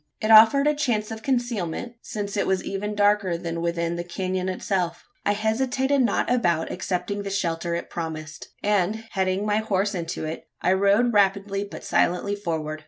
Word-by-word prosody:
It 215 - 0
offered 225 +6 +8
a 300 - +4
chance 235 -8 -1
of 220 0 -6
concealment: 240 -4 -2
since 205 -1 -5
it 200 - 0
was 190 -1 +1
even 210 +2 -3
darker 205 -4 +2
than 165 0 -4
within 170 0 -1
the 175 - -3
canon 185 +1 -2
itself. 180 -2 -2 0.2
I 205 - +4
hesitated 260 +6 +1
not 240 - +1
about 175 -10 +1
accepting 185 +2 -3
the 200 - -4
shelter 170 -3 -1
it 170 - -4
promised; 155 -2 -6 0.2
and, 210 +1 +1
heading 190 +1 0
my 210 0 +1
horse 205 -2 0
into 170 -3 -4
it, 155 +1 -6
I 180 - +2
rode 200 +5 +3
rapidly 200 0 +2
but - - -9
silently 180 +4 +1
forward. 160 -6 -3
195 Hz, 170 wpm, -24 LUFS, 175-215 Hz, 0.2 s, offered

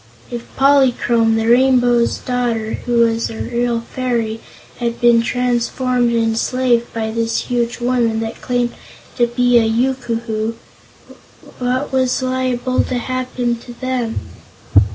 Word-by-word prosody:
If 240 -1 -6
Polychrome, 250 -4 +3
the 225 0 0
Rainbow's 245 -1 +4
Daughter, 235 -3 -2
who 240 -1 +3
was 230 0 +1
a 225 - -7
real 240 0 -1
fairy, 235 -2 -2 0.4
had 235 -1 -2
been 235 -1 +5
transformed 245 0 0
and 230 -1 +2
enslaved 235 +1 +1
by 220 -1 -3
this 230 0 -1
huge 240 -1 -1
woman, 240 -2 +1
who 225 0 -2
claimed 245 -1 -1 0.4
to 240 -1 +3
be 245 0 +3
a - - +2
Yookoohoo, 230 -2 -1 1.0
what 255 +3 -1
was 260 0 +1
liable 255 -1 0
to 255 - -2
happen 250 -1 -2
to 240 +1 -12
them? 255 -3 -2
240 Hz, 130 wpm, -18 LUFS, 230-255 Hz, 1.0 s, been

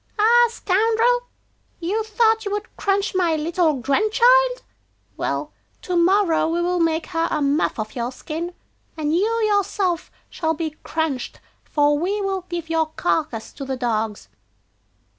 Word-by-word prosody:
'Ah, 475 +3 +5
scoundrel! 455 +4 +1 0.5
you 390 +6 -1
thought 445 0 +2
you 405 - -3
would 415 +1 -5
crunch 400 0 0
my 350 -4 +2
little 325 +1 +1
grandchild! 475 - +3 0.5
Well, - - -3 0.3
to 360 - -2
morrow 350 -1 +3
we 335 +1 0
will 355 +1 0
make 325 -1 +1
her 330 -1 -1
a 310 - 0
muff 285 +2 +1
of 215 -1 -5
your 240 0 -2
skin, 335 +6 -6 0.4
and 305 -1 -1
you 400 +6 +2 0.2
yourself 395 -4 0 0.2
shall 320 -1 -2
be 320 -1 -3
crunched, 315 -6 -3 0.2
for 290 -1 +2
we 390 +5 -1
will 385 -2 -2
give 340 -2 -4
your 325 -1 +1
carcass 305 -10 -1
to 280 - -7
the 265 -1 -3
dogs. 220 -4 -2
345 Hz, 145 wpm, -22 LUFS, 310-415 Hz, 0.5 s, Ah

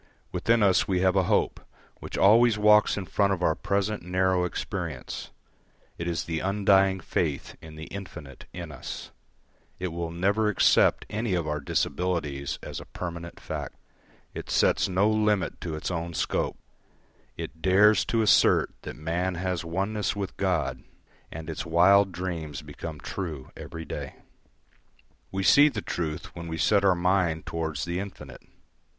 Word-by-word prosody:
Within 115 -1 +2
us 95 -2 +4
we 90 -2 +1
have 95 0 +3
a 95 -2 +3
hope - - +1 0.4
which - - -6
always 115 +3 +5
walks 105 0 +5
in 100 - -3
front 100 +1 +1
of 90 -2 -3
our 80 - +3
present 100 +3 -1
narrow 90 0 +1
experience; 90 - -5 0.7
it 85 - -3
is 85 -1 -1
the 80 -1 -3
undying 95 -1 +3
faith 80 -4 -2
in 80 -1 -11
the 80 - -8
infinite 80 -8 -9
in 85 -3 -7
us; 65 - -7 0.7
it 90 0 -3
will 85 0 -4
never 100 +6 +1
accept 105 - +4
any 110 -2 -1
of 85 -3 -1
our 75 0 -1
disabilities 75 -2 -1
as - - -6
a - - -10
permanent 85 -1 -7
fact; - - -6 0.6
it - - -7
sets - - +3
no 95 +3 +3
limit 105 -2 +1
to 80 -3 -4
its 80 - -4
own 85 -1 -4
scope; - - -1 0.8
it 80 - -7
dares 100 +3 +5
to 115 -1 +1
assert 105 - +4
that - - -7
man 85 +4 -2
has 90 -1 -2
oneness 100 +5 -1
with 100 -2 -4
God; 95 -5 -1 0.5
and 80 0 -7
its 80 - -4
wild 95 +4 +5
dreams 85 -6 -5
become 80 -3 -8
true 80 -9 -6
every 80 -1 -8
day. - - -6 1.2
We 95 0 -2
see 145 +9 +7
the 110 -7 -5
truth 80 -3 -4
when 85 0 -7
we 80 0 -4
set 100 +6 +3
our 95 -2 +4
mind 85 -2 +1
towards 80 -4 -3
the 85 +1 -2
infinite. 100 -1 -8
90 Hz, 155 wpm, -27 LUFS, 80-100 Hz, 1.2 s, see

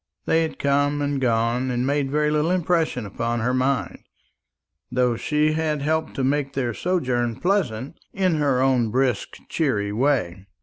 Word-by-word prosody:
They 165 - +3
had 160 - -3
come 145 +1 +1
and 145 -1 -1
gone, 120 +1 +1
and 125 0 -1
made 140 0 0
very 150 +1 +1
little 150 +2 +1
impression 170 -8 0
upon 115 +4 -2
her 125 +3 0
mind, 130 +1 0 0.9
though 125 -1 +2
she 150 +5 +1
had 155 -2 -1
helped 160 +1 -1
to 135 - -1
make 140 +1 0
their 125 -4 -1
sojourn 125 - -1
pleasant 160 - -1
in 185 -4 +1
her 140 -4 +2
own 125 -4 +2
brisk 130 +2 0
cheery 105 -11 0
way. 105 -7 0
135 Hz, 160 wpm, -23 LUFS, 120-150 Hz, 0.9 s, They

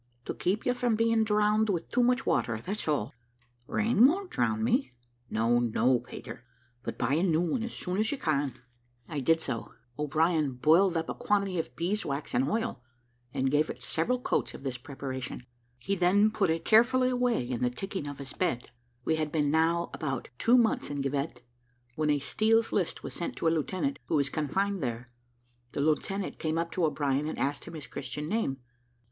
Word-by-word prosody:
"To - - -3
keep 195 +4 -1
you 250 - +3
from 245 -2 +1
being 230 0 +3
drowned 210 0 +2
with 175 -4 -2
too 250 - +3
much 250 +2 +2
water, 110 -2 +1
that's 205 -1 -3
all." 140 -6 0 0.5
"Rain 225 +2 +4
won't 370 +5 -1
drown 220 0 0
me." 245 - +1 0.4
"No, 115 +2 +2
no, 120 +2 +2
Peter; 120 0 -9 0.4
but - - -5
buy 125 +2 0
a 160 - +2
new 170 -3 +2
one 175 +8 0
as 230 +1 -4
soon 180 +2 -2
as 220 - +2
you 285 - -2
can." 145 - 0 0.5
I 150 -3 -3
did 165 +4 +3
so. 115 - -4 0.2
O'Brien 155 -1 +1
boiled 165 +8 +4
up 165 - -2
a - - -2
quantity 200 -3 0
of 160 - -4
bees' 190 +6 -1
wax 140 +1 -4
and 130 +3 +2
oil, 225 - -1 0.5
and 130 +1 0
gave 150 +2 +2
it - - -6
several 245 +11 +1
coats - - -1
of - - -11
this 130 -2 -2
preparation. 130 -2 -6 0.3
He 160 +11 -2
then 200 +4 +4
put 200 -4 +1
it 165 0 -1
carefully 255 +3 +5
away 245 - +1
in 125 -2 -3
the 125 - +3
ticking 190 +5 -5
of 145 -1 -6
his 140 -1 -8
bed. 130 -10 -2 0.3
We 160 - +2
had 155 -1 -1
been 150 -2 +1
now 165 +2 +2
about 135 -6 -3
two 240 +2 +5
months 235 -2 +2
in 145 -1 -2
Givet, 140 -2 -2 0.5
when 155 -1 0
a 145 - +4
Steel's 220 +11 +2
List 185 -5 -1
was - - -6
sent 170 - -4
to - - -1
a 160 - +4
lieutenant, 185 - -1
who - - 0
was 140 -2 +3
confined 190 +7 -1
there. 120 -1 -3 0.6
The - - -1
lieutenant 170 +6 -1
came 160 0 -1
up 170 0 -1
to 180 - +1
O'Brien, 145 -1 0
and - - -5
asked 140 +1 -1
him 170 - -9
his 150 -3 -6
Christian 150 0 -5
name. 190 -9 0
165 Hz, 200 wpm, -29 LUFS, 140-210 Hz, 0.6 s, carefully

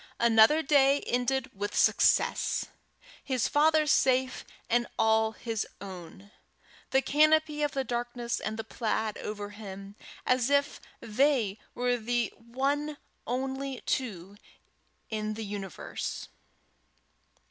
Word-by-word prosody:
another 235 +7 +5
day 280 -1 +4
ended 255 +1 -1
with 205 +1 -4
success! - - +3 0.6
his 255 -4 0
father 310 +1 +4
safe, 260 -3 +2 0.2
and 240 +1 +1
all 220 0 +3
his 225 -2 -3
own! 190 +1 -10 0.6
the 265 0 +2
canopy 310 0 +3
of 295 -1 0
the 270 - -1
darkness 240 -1 -3
and 215 0 -4
the 225 - -3
plaid 220 -1 -2
over 205 -1 -6
them, 195 -1 -9 0.3
as 255 0 +2
if 285 0 +1 0.2
they 230 -3 +1 0.2
were 245 0 +1
the 240 -1 -1 0.9
only 265 +2 -3
two 200 -6 -3 0.7
in 215 0 -2
the 220 0 -5
universe! 200 -4 -5
240 Hz, 110 wpm, -29 LUFS, 215-270 Hz, 0.9 s, another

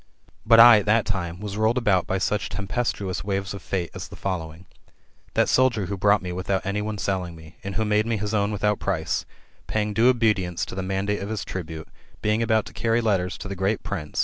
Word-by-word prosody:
But 115 0 +7
I, 115 -2 +10
at 105 - -6
that 110 +1 +3
time, 85 -4 -3
was 105 -1 -5
rolled 110 +3 +2
about 105 -7 +2
by 95 - 0
such 105 +3 -1
tempestuous 100 -2 -2
waves 95 0 -2
of 100 - -7
Fate 90 -3 -3
as - - -6
the - - -11
following: 85 -2 -5 0.7
That - - +3
soldier 125 -6 +3
who 100 +3 -3
bought 100 +1 +3
me 90 - -4
without 90 +2 -2
anyone 105 +2 -2
selling 95 -4 -2
me, 80 0 -14
and 100 0 -5
who 110 - 0
made 105 +1 +2
me 115 -1 0
his 105 +1 -3
own 100 -1 +1
without 105 0 0
price, 90 -5 -1 0.4
paying 105 -1 -1
due 115 +4 +4
obedience 105 -8 +1
to - - -9
the 95 - -3
mandate 95 +2 -1
of 100 - -5
his 110 -2 -3
tribune, 80 -4 -6 0.4
being 105 +2 +2
about 110 -1 +2
to - - -11
carry 115 0 +1
letters 95 -6 0
to - - -7
the 100 - -4
great 95 +3 -1
prince 90 -6 -5
[i. - - +2
100 Hz, 225 wpm, -24 LUFS, 95-110 Hz, 0.7 s, I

